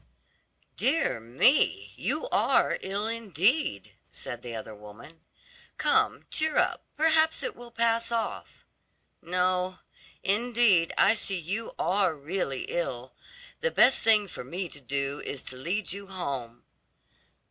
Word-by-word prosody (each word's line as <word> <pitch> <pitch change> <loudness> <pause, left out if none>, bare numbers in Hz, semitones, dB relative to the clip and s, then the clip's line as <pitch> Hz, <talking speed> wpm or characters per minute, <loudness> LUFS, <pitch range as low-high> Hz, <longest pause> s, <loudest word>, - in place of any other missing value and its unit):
"Dear 275 - +1
me, 130 - +2
you - - -2
are - - +2
ill 200 +2 -1
indeed," 220 - 0 0.2
said 120 -1 -5
the 120 -2 -7
other 110 0 -7
woman. 105 +10 -13 0.6
"Come, - - +2
cheer 315 0 +1
up; - - +1
perhaps 320 +1 +3
it - - -3
will 240 0 -11
pass 230 0 +1
off. 230 -1 -4 0.6
No, 180 +1 0 0.5
indeed, 215 -4 +3
I 200 - +6
see 200 -3 -2
you 195 +7 -4
are 185 -1 +1
really 145 -2 -3
ill; 130 -7 -4 0.5
the 485 - +1
best 265 - +5
thing 215 -2 +4
for - - -8
me 175 +8 -4
to 145 - -9
do 140 +2 -2
is 135 - -4
to 130 - -6
lead 170 +9 -2
you 200 0 -8
home." 135 -11 -5
185 Hz, 130 wpm, -28 LUFS, 140-230 Hz, 0.6 s, I